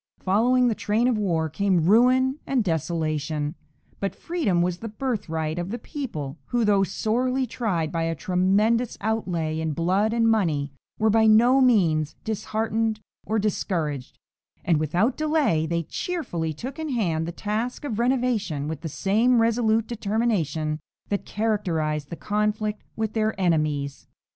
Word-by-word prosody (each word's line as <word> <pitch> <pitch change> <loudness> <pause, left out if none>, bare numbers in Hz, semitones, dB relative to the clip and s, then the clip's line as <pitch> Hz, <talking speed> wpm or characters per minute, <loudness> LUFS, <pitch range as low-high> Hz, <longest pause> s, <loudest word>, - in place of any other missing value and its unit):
Following 245 +6 +3
the 235 - +2
train 220 +3 +1
of 250 - +2
war 170 -7 0
came 180 +1 +1
ruin 255 - +4
and 260 -4 +1
desolation, 155 -3 -1 0.5
but 195 - -2
freedom 240 - 0
was 175 0 -1
the 225 - -6
birthright 185 -9 -2
of 175 +1 -3
the 235 - -3
people, 170 - -6
who, 240 -2 0
though 205 -2 +4
sorely 250 +7 0
tried 195 -10 -2
by 165 - -1
a 165 0 -1
tremendous 195 - +1
outlay 180 -8 -1
in 160 -1 -1
blood 185 +7 +1
and 230 0 +2
money, 160 -11 +1 0.2
were 220 0 +3
by 220 +1 +4
no 240 +5 +6
means 170 - +3
disheartened 220 +1 -1 0.3
or 220 - +1
discouraged, 165 -9 -2 0.5
and 170 -3 +3
without 175 - +1
delay 300 - +1
they 170 +1 -1
cheerfully 175 - -3
took 255 - -7
in 315 -1 -3
hand 170 - 0
the - - -3
task 220 - -3
of 225 -6 -3
renovation 235 - 0
with 155 -2 -5
the 165 - -4
same 215 - +2
resolute 225 -1 +2
determination 200 - -1 0.3
that 200 - -2
characterized 165 -9 -1
the 170 - -5
conflict 210 +2 -1
with 220 -1 -2
their 220 -2 0
enemies. 150 -6 0
205 Hz, 150 wpm, -25 LUFS, 160-230 Hz, 0.5 s, no